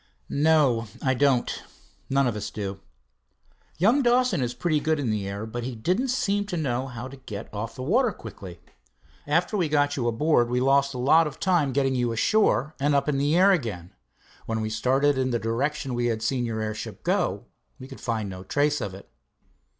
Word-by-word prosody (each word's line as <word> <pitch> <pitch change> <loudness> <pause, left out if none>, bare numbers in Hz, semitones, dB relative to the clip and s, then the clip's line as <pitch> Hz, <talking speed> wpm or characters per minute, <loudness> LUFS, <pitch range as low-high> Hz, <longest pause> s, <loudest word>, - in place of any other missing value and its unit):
"No, 140 -6 +3 0.2
I 130 - +2
don't 130 -2 +1 0.5
none 135 0 +3
of 120 -3 0
us 105 - -4
do. 100 -2 -5 1.0
Young 225 - +4
Dawson 245 - +2
is 120 -1 -2
pretty 155 0 +1
good 155 +1 0
in 125 -6 -1
the 105 -2 -2
air, 100 +2 -4
but 120 +2 -5
he 125 0 -4
didn't 185 - 0
seem 205 -5 0
to 180 - -3
know 130 -4 -1
how 125 -1 -7
to 135 +1 -11
get 105 -6 -8
off 110 +2 -5
the 130 - -6
water 230 - +2
quickly. 95 - -10 0.7
After 170 +8 +1
we 175 -6 +1
got 145 -1 +2
you 125 -5 -1
aboard, 120 +1 +2
we 125 +1 +1
lost 140 +1 +2
a - - -3
lot 155 +6 +4
of 145 - -9
time 175 -8 +2
getting 135 0 +1
you 120 -2 0
ashore, 145 - +2
and, 145 +1 +2
up 140 - +1
in 140 -2 +1
the 145 +4 +2
air 195 +2 +6
again, 105 - -2 0.5
when 115 0 -1
we 110 0 -3
started 130 +5 +2
in 130 0 +1
the 120 - +1
direction 130 +4 -2
we 120 0 0
had 110 -1 -2
seen 125 -3 0
your 110 -1 -3
airship 110 -1 -5
go, 175 - 0 0.3
we 130 -1 -10
could 135 - -11
find 110 -3 -2
no 95 -1 -7
trace 145 +6 +1
of 100 -3 -4
it." 100 - -13
130 Hz, 205 wpm, -25 LUFS, 115-150 Hz, 1.0 s, air